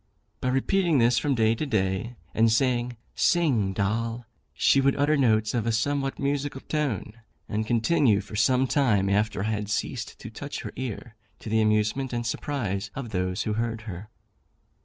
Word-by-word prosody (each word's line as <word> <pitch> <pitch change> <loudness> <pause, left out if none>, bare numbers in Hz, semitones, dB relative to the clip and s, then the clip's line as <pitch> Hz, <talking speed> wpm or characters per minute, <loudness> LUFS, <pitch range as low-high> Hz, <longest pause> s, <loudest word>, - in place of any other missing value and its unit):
By - - -2
repeating 165 +5 +2
this 120 0 +4
from 140 -2 0
day 110 -1 +3
to 115 - -3
day, 105 0 -1 0.2
and 115 0 +3
saying 120 0 +1 0.2
"Sing, 130 - +2
Doll," 115 +4 -2 0.3
she 135 - +3
would 135 0 +3
utter 145 +2 +2
notes 110 -6 +2
of 115 -2 -1
a - - +2
somewhat 135 +4 0
musical 140 -1 -2
tone, 115 -7 -3 0.3
and 110 +1 -2
continue 120 -1 +3
for 100 +1 -8
some 125 +5 +3
time 110 -8 +2
after 105 0 +1
I 110 - -1
had 105 -1 -3
ceased 105 - -3
to - - -9
touch - - -6
her - - -7
ear, 120 -2 -5 0.2
to - - -8
the 110 +1 +2
amusement 110 +5 +1
and 120 0 -2
surprise 105 -6 -2
of 125 -5 -5
those 90 +1 -1
who 110 - -1
heard 115 0 -2
her. 105 -1 -8
115 Hz, 175 wpm, -26 LUFS, 105-135 Hz, 0.3 s, this